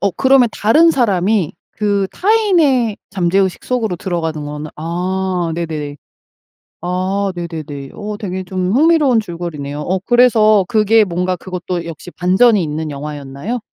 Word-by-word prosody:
어 200 - +1
그러면 265 -2 +4
다른 310 +11 +4
사람이 205 - +1 0.2
그 200 -2 0
타인의 340 - +2
잠재의식 190 +1 0
속으로 225 -8 -1
들어가는 160 -4 -3
거는 150 +1 -6
아 180 +1 -2
네네. 155 -4 -4 0.9
아 190 +2 -1
네네네. 155 -5 -6
어 210 0 -6
되게 190 -3 -4
좀 185 0 -2
흥미로운 295 -3 +4
줄거리네요. 165 -7 -5
어 185 +4 -1
그래서 215 -3 +4
그게 215 +1 +4
뭔가 180 0 -1
그것도 180 -1 -5
역시 165 +1 -9
반전이 190 +4 +3
있는 155 0 -3
영화였나요? 145 - -5
185 Hz, 300 characters per minute, -17 LUFS, 165-220 Hz, 0.9 s, 그러면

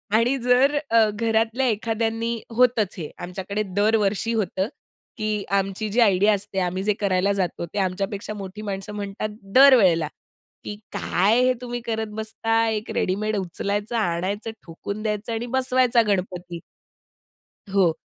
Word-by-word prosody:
आणि 245 +4 +3
जर 260 +4 +4
अ, 225 -2 +5
घरातल्या 225 +3 0
एखाद्यांनी 225 +1 -1 0.2
होतच 230 -5 +3
हे 160 -4 -5
आमच्याकडे 190 +3 -3
दरवर्षी 210 +1 +2
होतं, 195 -2 -1 0.5
की 215 -2 -1
आमची 195 +2 0
जी 230 - 0
आयडिया 205 0 +4
असते, 200 -1 -3
आम्ही 185 +1 -1
जे 210 +1 +2
करायला 195 -1 +1
जातो, 185 -3 -2
ते 200 - -5
आमच्यापेक्षा 195 +2 -2
मोठी 200 0 -7
माणसं 200 0 -5
म्हणतात 200 +1 -4 0.3
दर 270 0 +9
वेळेला, 165 -7 +3 0.6
"की 205 - -5 0.2
काय 210 +7 +2
हे 255 0 +4
तुम्ही 245 -1 -4
करत 220 -1 -2
बसता? 225 +1 0
एक 215 -1 -3
रेडीमेड 210 +3 0
उचलायचं, 200 +5 -3
आणायचं 200 +3 -1
ठोकून 200 +5 -6
द्यायचं, 215 +1 -2
आणि 225 +2 -2
बसवायचा 255 -2 +3
गणपती." 180 -3 -2 1.2
हो. 190 -4 +5
210 Hz, 140 wpm, -23 LUFS, 195-225 Hz, 1.2 s, दर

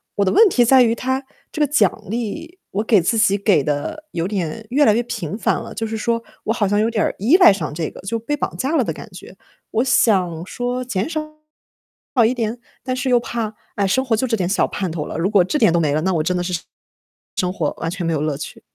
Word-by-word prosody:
我 200 - +2
的 190 - +2
问 450 - +6
题 245 -7 +3
在 260 +1 +6
于 230 -1 +2
它 260 +2 -2 0.3
这 - - -6
个 295 - +5
奖 220 - +2
励， 315 - -5
我 205 +3 -1
给 215 -4 +4
自 225 +7 +1
己 200 -2 +4
给 195 -8 +3
得 150 - -3
有 170 +1 -2
点 195 0 -3
越 290 +2 +4
来 215 - +5
越 235 - +2
频 180 -6 -5
繁 - - +1
了。 - - -8
就 225 -1 -3
是 220 - -4
说 230 +1 -1 0.2
我 225 - +1
好 210 -4 0
像 205 +1 +1
有 220 - +2
点 220 -2 0
儿 - - -2
依 240 - +4
赖 360 - +8
上 155 -7 -4
这 160 0 -3
个， - - -13
就 225 +4 -3
被 295 +6 -3
绑 - - -3
架 275 +5 -1
了 275 - +3
的 - - -3
感 225 - -10
觉。 180 +1 -12 0.4
我 225 - +1
想 185 -9 +2
说 245 +3 -3
减 210 +3 -2
少 320 - -2 1.1
一 230 - +2
点， 230 0 -2 0.2
但 255 0 -2
是 260 +1 -2
又 245 - +5
怕， 230 -2 -4 0.2
唉， 200 -1 +1
生 260 +7 +1
活 230 -4 +2
就 255 +4 -1
这 225 -2 0
点 180 - -1
小 205 - +2
盼 190 -4 -3
头 155 -2 -4
了， - - -5
如 180 +4 0
果 195 -4 +5
这 245 +12 -1
点 210 -7 +4
都 170 - +3
没 155 -3 +1
了， 155 - +1
那 190 +2 0
我 160 - +1
真 180 +2 0
的 175 - -1
是 180 - -3 0.8
生 180 -1 0
活 155 -6 -1
完 165 - -2
全 180 -1 -4
没 165 - 0
有 150 - -1
乐 150 -2 -1
趣。 - - -8
215 Hz, 280 characters per minute, -20 LUFS, 180-245 Hz, 1.1 s, 赖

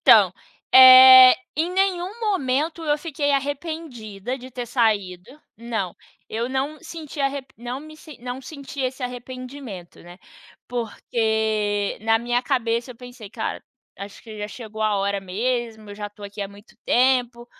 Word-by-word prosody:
Então, - - +6 0.4
eh, 260 0 +10 0.2
em 325 +3 0
nenhum 380 +2 -1
momento 325 - -1
eu 295 -1 +1
fiquei 290 -2 -2
arrependida 275 - -4
de 255 +1 -11
ter 245 -1 -6
saído 210 -6 0 0.3
não, 220 -5 -4 0.3
eu 230 +2 -3
não 270 +4 -3
senti 320 -3 -8
a 275 - +3 0.3
não 245 +4 -6
me 310 +1 -12 0.3
não 250 +1 -6
senti 280 0 -9
esse 260 +1 -3
arrependimento, 250 -5 -8
né, 175 +1 -13 0.5
porque 220 -3 -1
na 225 0 +3
minha 240 +1 -1
cabeça 235 0 -1
eu - - -23
pensei: 245 -3 -11
"Cara, 225 0 -4 0.4
acho 200 +1 -9
que 220 -2 -10
já 210 0 -4
chegou 220 -1 -9
a 215 -1 +1
hora 200 0 -1
mesmo, 220 +2 -3
eu - - -8
já 205 0 -6
tô 205 0 -17
aqui 205 +1 -8
há 200 - -3
muito 200 +2 -17
tempo, 245 -1 +2
245 Hz, 150 wpm, -23 LUFS, 215-270 Hz, 0.5 s, eh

